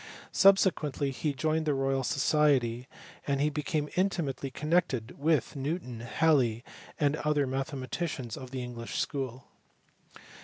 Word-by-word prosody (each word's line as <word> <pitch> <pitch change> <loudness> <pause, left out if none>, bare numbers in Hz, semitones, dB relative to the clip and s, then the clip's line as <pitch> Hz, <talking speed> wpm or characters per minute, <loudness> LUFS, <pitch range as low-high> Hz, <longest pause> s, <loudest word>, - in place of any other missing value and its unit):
Subsequently 160 -8 +3
he 145 +4 -1
joined 155 +3 0
the 145 - +2
Royal 135 0 0
Society, 135 -4 +2 0.4
and 145 +1 +1
became 150 0 -1
intimately 165 -8 0
connected 150 -5 0
with 155 +1 +1
Newton, 135 -4 -3
Haliey, 120 -2 +2 0.4
and 145 0 +2
other 150 -2 +1
mathematicians 135 -1 -3
of 130 -1 -8
the 130 -1 -4
English 120 -1 -6
school. 130 -3 -3
140 Hz, 115 wpm, -30 LUFS, 130-155 Hz, 0.4 s, Subsequently